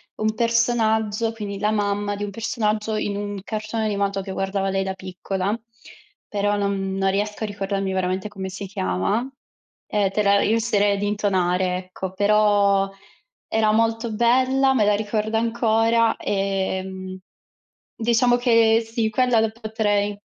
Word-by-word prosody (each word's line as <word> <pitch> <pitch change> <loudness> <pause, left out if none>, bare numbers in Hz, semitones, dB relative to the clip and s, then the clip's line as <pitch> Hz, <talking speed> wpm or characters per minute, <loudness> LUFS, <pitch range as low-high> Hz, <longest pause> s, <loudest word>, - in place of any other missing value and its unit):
un 215 0 0
personaggio, 225 -1 +1
quindi 200 -3 -6
la 210 0 +1
mamma 205 -1 0
di 205 - -5
un 205 - -4
personaggio 215 0 -1
in 205 -1 -2
un 205 -1 -4
cartone 215 +1 -3
animato 200 -2 -1
che 190 0 -7
guardava 195 0 -1
lei 195 0 0
da 190 0 -3
piccola, 190 +2 -3 0.7
però 205 0 0
non 195 -1 -1
non 195 0 +1
riesco 210 +2 -2
a - - -1
ricordarmi 195 -1 -2
veramente 185 +2 -1
come 190 -2 -6
si 195 +2 -6
chiama. 185 - -1 0.6
Eh, 205 -2 +1
te 210 +1 0
la 200 0 +4
riuscirei 210 -2 +2
ad 200 - -3
intonare, 185 -3 +1
ecco, 185 0 -7
però 205 -1 +3 0.6
era 220 -1 +2
molto 225 +1 +1
bella, 260 +4 +3
me 225 -5 +3
la 205 0 +3
ricordo 215 +1 -1
ancora, 230 0 +2
ehm, 190 -1 -2 0.8
diciamo 240 +2 +3
che, 230 -2 +4
sì, 225 -1 -1
quella 245 +1 +2
la 220 0 +2
potrei 210 -3 -1
205 Hz, 145 wpm, -23 LUFS, 195-225 Hz, 0.8 s, la